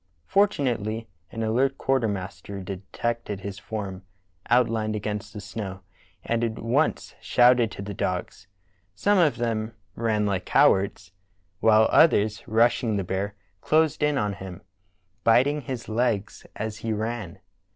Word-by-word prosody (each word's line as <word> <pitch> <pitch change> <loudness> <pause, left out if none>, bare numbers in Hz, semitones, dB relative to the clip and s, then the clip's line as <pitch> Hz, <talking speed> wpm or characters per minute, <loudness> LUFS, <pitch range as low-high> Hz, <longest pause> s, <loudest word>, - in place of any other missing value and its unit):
Fortunately 120 - +1 0.2
an 115 - -3
alert 130 +5 +1
quartermaster 100 -6 -2
de 95 0 -5
tected 115 -4 -3
his 95 -1 -6
form 100 -4 -5 0.5
outlined 115 -3 +2
against 105 0 -4
the 105 - -7
snow 100 -2 -6 0.4
and 115 0 0
at 115 -1 -1
once 130 +7 0
shouted 120 -2 +4
to 100 - -7
the 100 0 -5
dogs. 90 0 -3 0.5
Some 205 - +3
of 150 -9 +3
them 115 -2 -2 0.2
ran 110 -2 0
like 100 -2 -1
cowards, 95 -1 +3 0.5
while 110 +1 +5
others, 110 -9 +4
rushing 115 -1 +2
the 100 - -1
bear, 95 +3 -3 0.3
closed 155 -1 +2
in 150 -1 +2
on 105 -4 0
him, 95 -2 -9 0.6
biting 135 +6 +4
his 125 -2 -6
legs 110 -2 -1
as 110 0 -4
he 115 +1 -3
ran. 110 -4 -3
110 Hz, 135 wpm, -25 LUFS, 100-120 Hz, 0.6 s, while